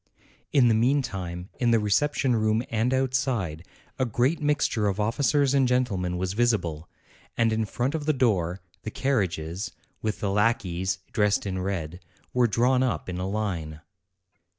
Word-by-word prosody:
In 135 -5 +5
the 115 - +4
meantime, 110 -8 0
in 120 - +2
the 115 - +5
reception 125 +5 +1
room 110 +1 +1
and 115 +2 +1
outside, 125 - 0 0.4
a - - +3
great 125 +8 +1
mixture 145 -7 +1
of 100 +1 -1
officers 135 +5 +2
and 135 -2 +4
gentlemen 100 -9 0
was 90 +1 -2
visible, 100 -9 0 0.5
and 115 -1 +3
in 110 0 0
front 120 +6 -2
of 155 -2 -3
the - - +5
door, 100 - +1 0.2
the 110 - -5
carriages, 95 - -1 0.3
with 110 -1 -2
the 100 - -1
lackeys 95 -4 +1
dressed 105 -1 +1
in 95 -2 -2
red, 90 -3 -3 0.3
were 125 -1 +4
drawn 125 +4 +2
up 125 -7 -1
in 90 0 -4
a 95 +1 -2
line. 90 -8 -3
110 Hz, 155 wpm, -26 LUFS, 95-125 Hz, 0.5 s, In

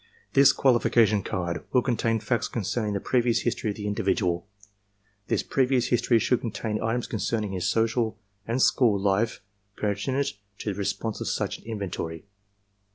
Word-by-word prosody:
This 140 0 +7
qualification 115 -5 +3
card 85 -3 -3
will 125 - +3
contain 115 -2 +1
facts 110 +1 -1
concerning 110 0 -2
the - - 0
previous 120 +1 +1
history 120 -2 -1
of 100 - -3
the 105 - -6
individual. 95 -3 0 0.8
This - - 0
previous 130 -2 +1
history 120 0 +3
should 125 +2 +1
contain 110 -1 -3
items 115 +2 -1
concerning 110 -2 -2
his 90 -2 -2
social 115 0 +1 0.3
and 115 +3 0
school 110 -6 +4
life 100 +3 +1 0.4
per 105 -1 0
tinent 135 +7 -1 0.2
to 105 - -3
the 100 +1 -3
purpose 110 +2 -3
of - - -3
such - - -2
an - - -21
inventory. 95 -7 -5
110 Hz, 160 wpm, -26 LUFS, 100-120 Hz, 0.8 s, This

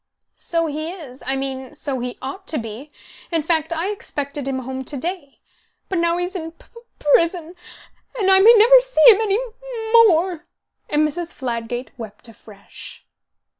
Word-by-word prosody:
"So 335 -1 -1
he 310 +1 -4
is. 285 -8 -11
I 270 - 0
mean, 265 +1 -5
so 280 -3 -4
he 245 0 -5
ought 380 +9 -7
to 315 - 0
be. 230 +5 -7 0.4
In 330 -2 0
fact 320 0 0
I 335 +3 -2
expected 285 -8 -5
him 270 -1 -2
home 260 +1 -5
to 285 - -3
day. 330 -1 -6 0.5
But 370 - -1
now 340 0 +1
he's 355 +2 -3
in 325 -2 -5
p - - -23
p 465 - -12 0.2
prison, 335 +3 +1 0.6
and 390 -4 +2
I 380 - +6
may 450 +5 +8
never 485 +4 +8
see - - +1
him 430 0 +2
any 410 -3 +1
m - - -2 0.4
mo 460 0 +8
more." 345 -1 0 0.4
And 300 +1 +2
Mrs. 345 +3 -5
Fladgate 240 -1 -4
wept 220 0 -10
afresh. 205 -2 -13
315 Hz, 175 wpm, -21 LUFS, 265-365 Hz, 0.6 s, may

